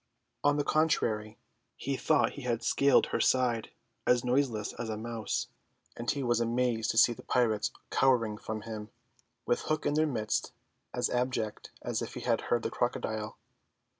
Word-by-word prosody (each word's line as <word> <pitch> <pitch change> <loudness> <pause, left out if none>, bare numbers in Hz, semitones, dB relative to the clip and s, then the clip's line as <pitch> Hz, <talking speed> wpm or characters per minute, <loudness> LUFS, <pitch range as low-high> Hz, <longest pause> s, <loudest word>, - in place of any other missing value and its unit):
On 145 0 +4
the 145 - +2
contrary, 110 -10 +1 0.4
he 140 +1 -2
thought 150 +2 +2
he 140 - -9
had 120 -2 -1
scaled 140 +3 +4
her - - +2
side 125 -3 +2 0.4
as 125 0 +4
noiseless 125 -4 +1
as 115 - -5
a 110 - -2
mouse; 115 -1 -3 0.5
and 120 - -4
he 140 -2 0
was 120 -2 +2
amazed 120 -1 +1
to - - -1
see 120 - +7
the - - -12
pirates 110 -4 +1 0.2
cowering 115 -5 +2
from 110 -1 -4
him, 105 -1 -7 0.6
with 120 - +2
Hook 155 -1 -1
in - - +2
their 155 +1 +3
midst 110 -6 -1 0.4
as 125 -1 -1
abject 125 -3 -1
as - - -1
if - - -5
he - - -5
had - - +1
heard - - +2
the - - -2
crocodile. 110 0 -2
120 Hz, 170 wpm, -30 LUFS, 110-130 Hz, 0.6 s, see